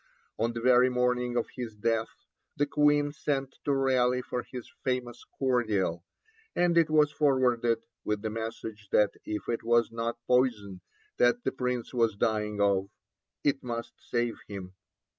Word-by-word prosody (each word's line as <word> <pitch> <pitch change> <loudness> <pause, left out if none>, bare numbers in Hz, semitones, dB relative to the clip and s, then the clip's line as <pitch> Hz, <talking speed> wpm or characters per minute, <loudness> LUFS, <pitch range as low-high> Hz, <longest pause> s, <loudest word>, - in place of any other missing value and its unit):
On 115 +1 +1
the 115 - -4
very 125 +1 +5
morning 125 -1 0
of 120 - +1
his 120 -4 -5
death 110 +1 -1 0.4
the 145 - +3
Queen 145 0 +3
sent 140 -2 -2
to 145 - +2
Raleigh 130 -2 +2
for 125 - -3
his 125 -1 -9 0.2
famous 125 -2 -2
cordial, 110 -10 +1 0.5
and 175 -1 +3
it 165 -2 +4
was 150 -1 +4
forwarded, 125 -5 +2 0.2
with 105 0 -2
the 110 - -2
message 110 -1 -6
that 105 -1 +4
if 105 - -4
it 115 - -1
was 120 0 +3
not 115 +1 -3
poison 110 -7 +1 0.4
that 120 0 +3
the 135 - 0
Prince 125 -2 -3
was 115 -4 +2
dying 105 -1 0
of, 100 -1 +2 0.5
it 140 -1 +1
must 120 -1 -4
save 120 -1 -2
him. 95 -2 -7
120 Hz, 155 wpm, -29 LUFS, 110-130 Hz, 0.5 s, very